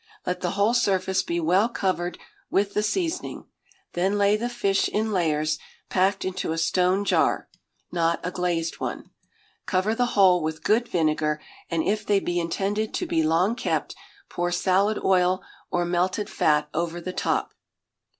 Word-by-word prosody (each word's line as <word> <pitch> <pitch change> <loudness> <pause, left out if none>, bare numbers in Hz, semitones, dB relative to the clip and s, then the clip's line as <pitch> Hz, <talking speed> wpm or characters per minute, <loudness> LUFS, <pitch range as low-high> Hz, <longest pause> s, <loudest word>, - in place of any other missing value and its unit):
Let 180 - -2
the 180 - 0
whole 205 +3 +3
surface 190 -5 +2
be 170 0 -2
well 185 +7 +3
covered 185 -5 -1 0.3
with 200 +1 +1
the 210 - +1
seasoning; 330 - -2 0.5
then 190 +4 +1
lay 200 0 +4
the 235 +3 -2
fish 200 -5 +1
in 220 +1 -1
layers 155 -5 +1 0.3
packed 190 +1 +1
into 185 -3 -2
a 165 - -2
stone 180 +4 +2
jar - - +2 0.4
(not 170 -1 +1
a 180 - -2
glazed 175 -2 -2
one); - - -5 0.6
cover 190 +3 +1
the 245 +2 +1
whole 185 -3 +6
with 155 0 -3
good 235 +3 +2
vinegar, 155 -3 0 0.3
and 165 -2 0
if 210 +1 0
they 205 -1 +2
be 175 -2 -1
intended 200 +5 -1
to - - -1
be 165 - +1
long 165 +7 +2
kept, - - -2 0.3
pour 175 0 -2
salad 195 +4 +2
oil 185 -1 +3 0.3
or 175 -1 0
melted 180 +4 0
fat 150 -1 +2
over 170 0 -2
the 180 +2 -5
top. - - -1
185 Hz, 160 wpm, -25 LUFS, 170-205 Hz, 0.6 s, whole